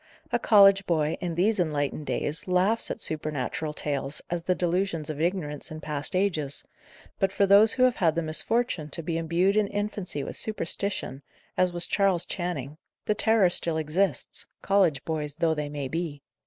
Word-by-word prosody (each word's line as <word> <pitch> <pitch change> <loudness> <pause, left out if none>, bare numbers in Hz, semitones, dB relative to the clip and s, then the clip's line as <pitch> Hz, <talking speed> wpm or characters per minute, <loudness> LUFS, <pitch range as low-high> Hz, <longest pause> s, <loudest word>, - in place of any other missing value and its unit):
A - - +1
college 195 -2 +6
boy, 155 -3 +1
in 175 -2 -3
these 200 +5 +2
enlightened 150 -3 -1
days, 150 +5 -2
laughs 185 +5 +2
at - - -5
supernatural 155 0 -2
tales 145 -1 -3
as 175 -1 -2
the 180 - +2
delusions 175 -3 -1
of 150 0 -6
ignorance 165 -4 -2
in 155 - -7
past 150 +1 -3
ages; 160 -7 -1 0.6
but 195 -1 +2
for 200 - +2
those 200 +3 +6
who 255 - +2
have 255 -1 +3
had 165 -3 +2
the 170 - 0
misfortune 160 +1 0
to 165 - -6
be 165 +1 -3
imbued 170 +4 +1
in 215 -1 +3
infancy 200 -7 -3
with - - -5
superstition, 200 - -2 0.3
as 185 -1 +2
was 175 0 -2
Charles 195 -4 +1
Channing, 155 -5 -4 0.3
the 210 - +2
terror 215 -3 +3
still 165 -2 +1
exists, 160 0 -1 0.2
college 185 -9 +2
boys 150 -2 -3
though 165 0 +1
they 150 -1 -3
may 145 -2 -4
be. 155 -1 -4
170 Hz, 175 wpm, -26 LUFS, 150-195 Hz, 0.6 s, college